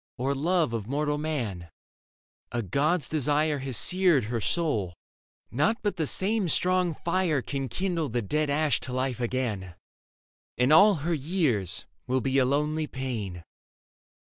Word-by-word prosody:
Or 135 Hz, +3 st, 0 dB
love 160 Hz, -1 st, +1 dB
of 110 Hz, -3 st, -3 dB
mortal 150 Hz, +2 st, -1 dB
man. 115 Hz, -, -3 dB, 0.8 s
A 120 Hz, -1 st, -2 dB
god's 145 Hz, -, 0 dB
desire 150 Hz, -1 st, 0 dB
I 155 Hz, -, +3 dB
o -, -, +1 dB
Leda 135 Hz, -, -7 dB
Has 130 Hz, -4 st, -1 dB
seared 180 Hz, -, +4 dB
her 115 Hz, +2 st, -3 dB
soul; 110 Hz, -, 0 dB, 0.6 s
nought 210 Hz, -, +1 dB
but 205 Hz, -3 st, -1 dB
the 160 Hz, -3 st, 0 dB
same 200 Hz, +2 st, +1 dB
strong 180 Hz, 0 st, +2 dB
fire 170 Hz, -6 st, 0 dB
Can 135 Hz, -2 st, -3 dB
kindle 170 Hz, -, -2 dB
the 120 Hz, 0 st, -1 dB
dead 150 Hz, +8 st, 0 dB
ash 145 Hz, -5 st, +1 dB
to 125 Hz, -, -7 dB
life 130 Hz, -1 st, -1 dB
again, 115 Hz, -8 st, -2 dB, 0.8 s
And 125 Hz, +4 st, +3 dB
all 200 Hz, +5 st, +7 dB
her 170 Hz, -, +1 dB
years 130 Hz, -, -1 dB, 0.2 s
will 130 Hz, +1 st, +1 dB
be 135 Hz, +1 st, +1 dB
a 130 Hz, -, +4 dB
lonely 150 Hz, +3 st, 0 dB
pain. 110 Hz, -11 st, -5 dB
140 Hz, 160 wpm, -27 LUFS, 120-165 Hz, 0.8 s, all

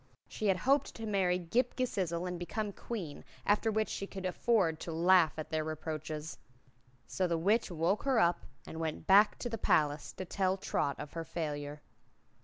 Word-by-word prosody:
She 215 Hz, -, -3 dB
had 190 Hz, -2 st, +3 dB
hoped 275 Hz, +8 st, +2 dB
to 225 Hz, -, -6 dB
marry 190 Hz, -4 st, +2 dB
Ghip 230 Hz, +9 st, 0 dB
Ghisizzle 185 Hz, -9 st, -1 dB
and 180 Hz, -1 st, -4 dB
become 205 Hz, +4 st, -3 dB
Queen, 190 Hz, -12 st, -6 dB, 0.2 s
after 210 Hz, +2 st, +3 dB
which 220 Hz, 0 st, +1 dB
she 195 Hz, -, -4 dB
could 190 Hz, -1 st, -7 dB
afford 185 Hz, -4 st, +1 dB
to 170 Hz, -, -5 dB
laugh 170 Hz, 0 st, +5 dB
at 155 Hz, -, -6 dB
their 155 Hz, -1 st, 0 dB
reproaches. 155 Hz, 0 st, -5 dB, 0.7 s
So 185 Hz, -, -1 dB
the 170 Hz, -1 st, 0 dB
Witch 205 Hz, +8 st, +2 dB
woke 175 Hz, +4 st, 0 dB
her 265 Hz, -4 st, +2 dB
up 175 Hz, -3 st, +2 dB, 0.2 s
and 160 Hz, -, -7 dB
went 160 Hz, -1 st, -3 dB
back 200 Hz, +2 st, +6 dB
to -, -, -4 dB
the 225 Hz, -2 st, -4 dB
palace 150 Hz, -3 st, +2 dB
to 185 Hz, -, -6 dB
tell 190 Hz, +1 st, 0 dB
Trot 145 Hz, -6 st, -1 dB
of 145 Hz, -, -7 dB
her 165 Hz, 0 st, -3 dB
failure. 150 Hz, -3 st, -4 dB
180 Hz, 185 wpm, -32 LUFS, 160-205 Hz, 0.7 s, back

